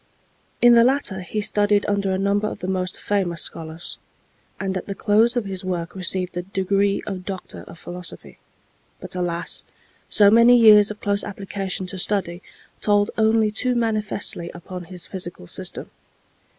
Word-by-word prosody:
In 240 0 +8
the 235 0 +7
latter 255 -7 +1
he 200 +4 -3
studied 205 0 +2
under 200 -1 0
a 190 - 0
number 200 +2 +1
of - - -5
the 180 - -6
most 185 -1 -2
famous 185 -5 -1
scholars, 160 +1 -6 0.6
and 195 -1 -2
at 185 - -4
the 200 - -4
close 225 +5 +3
of 235 - -1
his 190 -1 -6
work 175 -2 -3
received 185 -1 0
the 175 - -3
degree 195 +2 0
of 190 -3 -5
Doctor 190 -1 -7
of - - -12
Philosophy. 180 +1 -8 0.6
But, - - -6
alas! 175 -1 -1 0.5
so 205 -1 +6
many 235 +2 +7
years 215 -3 +7
of 210 0 -8
close 200 0 0
application 195 -2 -4
to 185 +1 -5
study 180 -3 0 0.4
told 205 -1 +2
only 220 -1 +3
too 250 +3 0
manifestly 215 -6 -1
upon 180 +1 -8
his 180 0 -7
physical 175 - -6
system. - - -5
195 Hz, 165 wpm, -22 LUFS, 180-210 Hz, 0.6 s, In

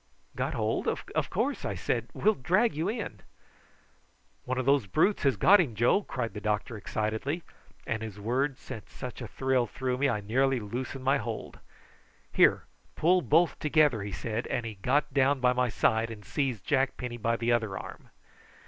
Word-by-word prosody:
"Got - - -2
hold? - - -1
Of - - -2
course," - - -1
I - - -2
said, - - -2
"we'll 215 - +3
drag 190 - +2
you 160 +5 -1
in." 215 - -4 1.3
"One 130 0 -2
of 130 - -1
those 135 -5 +3
brutes 195 - +2
has 135 -4 +2
got 205 +2 +7
him, 140 -11 0
Joe," 120 - +3
cried 120 - -4
the 105 - -6
doctor 105 +2 -1
excitedly, 110 - -2 0.4
and 110 0 -2
his 110 -2 -7
words 130 +6 -1
sent 110 - -9
such 125 +1 -8
a 120 - -5
thrill 130 -1 0
through 125 +2 -3
me 140 - +3
that 135 - +1
I 105 - -2
nearly 130 +5 +1
loosed 120 +6 -5
my 135 +2 +1
hold. 115 -4 -6 0.7
"Here, - - +4 0.3
pull 180 +3 +3
both 165 -1 +3
together," 150 -7 +3
he 100 0 -5
said, 115 +3 -3
as 120 - -1
he 115 -1 -5
got 135 +8 0
down 140 0 +3
by 125 0 +3
my 125 0 +1
side 110 +1 +1
and 105 -3 -9
seized 130 -8 -2
Jack 135 -2 +1
Penny 125 -1 -5
by 115 0 0
the 120 +1 0
other 110 -5 0
arm. - - -9
125 Hz, 185 wpm, -29 LUFS, 110-140 Hz, 1.3 s, got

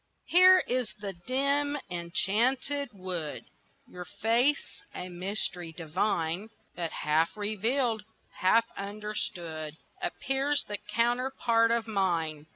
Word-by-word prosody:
HERE 370 +1 +7
is 250 -3 0
the 200 -1 -4
dim 280 +9 +1
enchanted 235 +11 +1
wood 185 -6 -5 0.4
Your 180 0 -8
face, 235 - +1
a 180 - -5
mystery 180 -1 -2
divine, 175 +3 -1 0.3
But 170 -2 -3
half 160 +5 +1
revealed, 220 +2 0 0.4
half 230 +5 +4
understood, 180 -7 -4 0.2
Appears 285 -4 0
the 205 -1 -3
counterpart 235 +1 +2
of 230 -1 +1
mine. 165 -7 0
210 Hz, 100 wpm, -29 LUFS, 175-250 Hz, 0.4 s, HERE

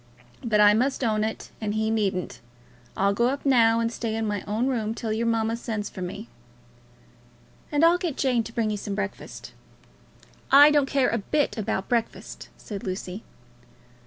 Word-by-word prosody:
But 220 -3 +1
I 210 0 +7
must 260 +5 0
own 215 -2 +1
it, 220 0 -4
and 210 -1 -2
he 220 0 0
needn't. 195 -5 -1 0.6
I'll 200 +1 +2
go 235 +4 +2
up 280 +3 -3
now 230 -4 +4
and 230 0 0
stay 230 -2 -3
in 225 0 -1
my 205 -2 -2
own 215 +4 0
room 225 -4 -1
till 220 -2 -3
your 230 +2 -1
mamma 225 0 +1
sends 220 -3 -4
for 185 - -8
me." 200 +5 -6 1.4
"And 295 +2 +4
I'll 345 +1 +4
get 345 -6 -3
Jane 250 -4 +1
to - - -8
bring 225 -2 0
you 210 - -2
some 200 0 -5
breakfast." 200 -1 -6 1.0
"I 290 +2 +9
don't 290 -2 +3
care 270 -2 +2
a 230 - 0
bit 290 +8 0
about 215 -3 -2
breakfast," 235 -2 -3
said 200 -3 -8
Lucy. 185 +1 -5
225 Hz, 180 wpm, -25 LUFS, 210-245 Hz, 1.4 s, I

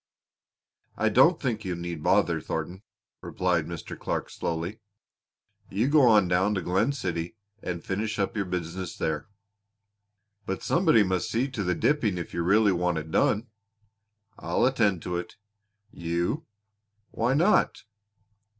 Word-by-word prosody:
"I - - +2
don't - - +5
think 110 -4 -2
you 90 -3 -3
need 85 -2 -5
bother, 90 -2 +2
Thornton," 85 +5 -4 0.4
remarked 90 -4 0
Mr. 85 -2 -7
Clark - - -3
slowly. 85 +6 -3 0.9
"You 110 +8 0
go 150 0 +5
on 105 -5 +5
down 95 +4 +2
to 95 - -1
Glen 95 +9 +1
City 90 -10 -3 0.3
and 90 -2 -4
finish 105 +3 -2
up 100 +1 -1
your 100 -2 -1
business 90 0 -4
there." 75 +2 -2 1.2
"But 95 - -3
somebody 160 - +4
must 95 +3 -1
see 120 +4 0
to 125 -6 -3
the 90 -1 0
dipping 115 - +1
if 85 - -6
you 85 - -1
really 100 +4 +4
want 90 -1 0
it 80 0 -5
done." 110 +7 +1 0.9
"I'll - - +1
attend 105 -9 +2
to 90 -1 -2
it." 90 - -6 0.6
"You!" 85 - -2 0.6
"Why 120 +4 +1
not?" 175 +8 +3
95 Hz, 140 wpm, -27 LUFS, 85-110 Hz, 1.2 s, don't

